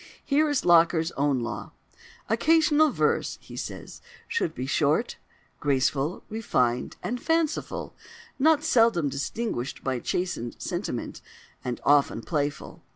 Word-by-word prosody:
Here 300 +2 +3
is 290 -3 0
Locker's 170 -1 +4
own 140 -2 0
law: 120 -3 -5 0.5
"Occasional 310 +5 +4
verse," - - 0
he - - -12
says, - - -7 0.3
"should 170 - -1
be 125 - -3
short, 150 - +1 0.4
graceful, 140 +3 0
refined, 125 - 0
and 245 +1 -3
fanciful, 325 -1 -1 0.4
not 305 +1 +4
seldom 225 - +3
distinguished 140 - -3
by 130 -2 -1
chastened 170 -7 -3
sentiment, - - -4 0.4
and 125 -1 -3
often 140 -5 +3
playful. 145 -3 -3
165 Hz, 115 wpm, -26 LUFS, -, 0.5 s, Locker's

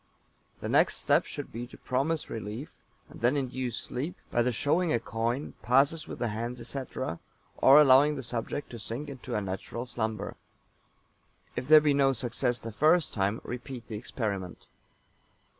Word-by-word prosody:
The - - -3
next - - +4
step - - +3
should - - -6
be 120 +2 -5
to - - -14
promise 140 +5 -1
relief, 110 +6 -6 0.3
and - - -13
then 125 +5 +3
induce 130 -3 -2
sleep 150 +9 -4 0.2
by 120 - +2
the 125 +1 +2
showing 155 +8 +1
a 120 - +2
coin, 115 +6 -2
passes 140 +5 +3
with - - -6
the 120 - -1
hands, 120 +4 -4
etc., 125 -6 -4 0.4
or 140 +3 +8
allowing 145 +1 +6
the 135 - -5
subject 120 +4 -4
to 120 - -7
sink 120 +7 -5
into 130 -3 -6
a 105 - +1
natural 100 +5 -5
slumber. 110 -4 -3 1.2
If 125 - -3
there 155 0 +9
be 150 -1 +3
no 135 -1 +4
success 125 0 -1
the 115 +1 -6
first 155 +8 +3
time, 100 +2 0
repeat 125 -1 -7
the 110 - -4
experiment. 105 -5 -4
125 Hz, 165 wpm, -29 LUFS, 115-140 Hz, 1.2 s, there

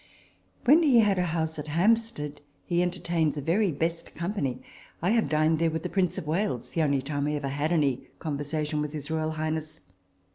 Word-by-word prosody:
When 295 +6 +7
he 280 -7 +5
had 200 -3 +2
a 180 - +2
house 160 -1 -2
at 150 - -6
Hampstead, 170 -3 +1 0.2
he 175 -1 +1
enter 180 0 -1
tained 165 -3 0
the - - -3
very 185 +6 +2
best 165 +3 -3
company. 165 -8 -2 0.4
I 180 +4 +1
have 230 -1 +2
dined 155 +1 +2
there 165 0 +3
with 160 0 -3
the - - -2
Prince 185 -3 0
of - - -4
Wales 160 - -1
the 165 - 0
only 140 -3 +2
time 145 0 -2
I 150 - 0
ever 140 -2 -2
had 145 +4 -1
any 140 -6 +1
conversation 150 0 -2
with 150 0 -3
his 150 0 -5
royal 160 -1 0
highness. 155 0 -3
160 Hz, 205 wpm, -27 LUFS, 150-175 Hz, 0.4 s, When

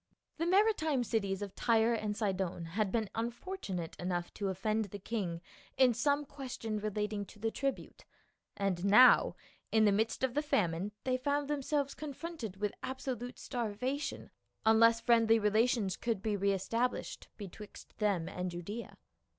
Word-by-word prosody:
The 330 +1 -1
maritime 350 - +3
cities 200 -4 -1
of 200 - -6
Tyre 230 0 +3
and 210 -2 -2
Sidon 190 -5 -1
had 210 -1 0
been 225 -2 0
unfortunate 230 - -4
enough 175 -1 -2
to 200 - -3
offend 215 +4 0
the 205 +1 -8
king 190 -5 -3 0.4
in 255 -2 +6
some 285 +5 +1
ques 270 -2 -7
tion 215 -1 -2
relating 210 0 -2
to - - -14
the 225 +2 -1
tribute, 275 +2 -3 0.5
and 195 -3 -1
now 215 +6 +7 0.4
in 220 -1 +5
the 205 - +5
midst 220 +5 0
of 260 -2 +1
the 295 - +1
famine 195 - 0
they 255 -1 +1
found 285 +2 0
themselves 285 -1 -1
confronted 300 - -6
with 205 0 -1
absolute 260 -2 -4
starvation 250 +4 -3 0.3
unless 230 +1 +6
friendly 230 -1 +4
relations 215 -1 +2
could 225 -5 -2
be 215 -2 0
re 200 0 +2
established 230 +6 -2
betwixt 205 +1 -10
them 200 -6 +1
and 180 0 -3
Judaea. 180 +7 -6
220 Hz, 150 wpm, -33 LUFS, 200-255 Hz, 0.5 s, now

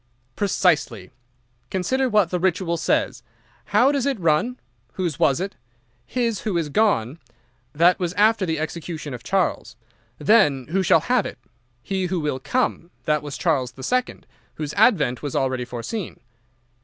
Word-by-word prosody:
"'Precisely. 160 - +1 0.6
Consider 255 +8 0
what 210 -6 +3
the 180 - 0
Ritual 180 -1 0
says: 165 - 0 0.4
How 265 +3 +4
does 280 -2 0
it 270 -6 -1
run? 170 +9 +1 0.4
"Whose 175 -6 -3
was 135 +2 +3
it?" 195 +2 -3 0.5
"His 235 -5 -1
who 200 -5 -2
is 160 -3 -1
gone." 150 - +1 0.5
That 170 +4 +4
was 175 -2 -1
after 210 +1 +3
the 160 -3 -1
execution 155 -1 -5
of 120 - -7
Charles. 185 - -1 0.4
Then, 145 - +3
"Who 190 +2 +2
shall 165 -3 +4
have 245 +4 +1
it?" - - -9 0.5
"He 190 -2 -1
who 180 0 -1
will 150 -4 -2
come." 175 - -1 0.2
That 150 -1 +1
was 145 -2 -6
Charles 135 -8 0
the 130 - -11
Second, 250 - -1 0.3
whose 150 -1 -4
advent 165 - +3
was 145 -3 -4
already 130 -2 0
foreseen. 125 - -5
170 Hz, 155 wpm, -23 LUFS, 145-205 Hz, 0.6 s, How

